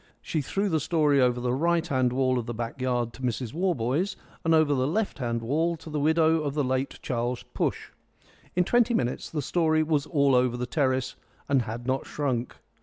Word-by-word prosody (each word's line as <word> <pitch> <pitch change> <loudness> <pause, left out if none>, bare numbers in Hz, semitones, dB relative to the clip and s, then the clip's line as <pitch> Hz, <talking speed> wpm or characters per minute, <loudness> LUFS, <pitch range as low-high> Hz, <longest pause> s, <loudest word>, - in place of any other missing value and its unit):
She 155 - -2
threw 195 +9 -1
the 160 -5 +1
story 150 -2 +2
over 125 -1 +2
the 125 0 -1
right 170 +4 +1
hand 130 -5 +1
wall 130 0 +1
of 120 - -6
the 120 - -4
back 120 +3 -5
yard 120 -2 0
to - - -12
Mrs 120 -2 -2
Warboys, 170 - 0 0.3
and 165 0 +4
over 155 -2 +4
the 130 -1 +1
left 200 +1 -1
hand 115 -2 -2
wall 160 +7 0
to 160 - -11
the 150 - -1
widow 160 +2 +3
of 145 -2 -3
the 150 - +1
late 130 +1 -1
Charles 120 0 -2
Push. - - -2 0.6
In 180 - +4
twenty 240 +4 +3
minutes 125 - -1
the 150 -3 -3
story 155 0 +2
was 155 -2 0
all 140 -4 +3
over 125 -1 +3
the 125 - -2
terrace 130 -1 0 0.3
and 140 -2 +3
had 115 +1 -6
not 130 +1 -1
shrunk. 130 -5 -2
140 Hz, 205 wpm, -27 LUFS, 125-160 Hz, 0.6 s, and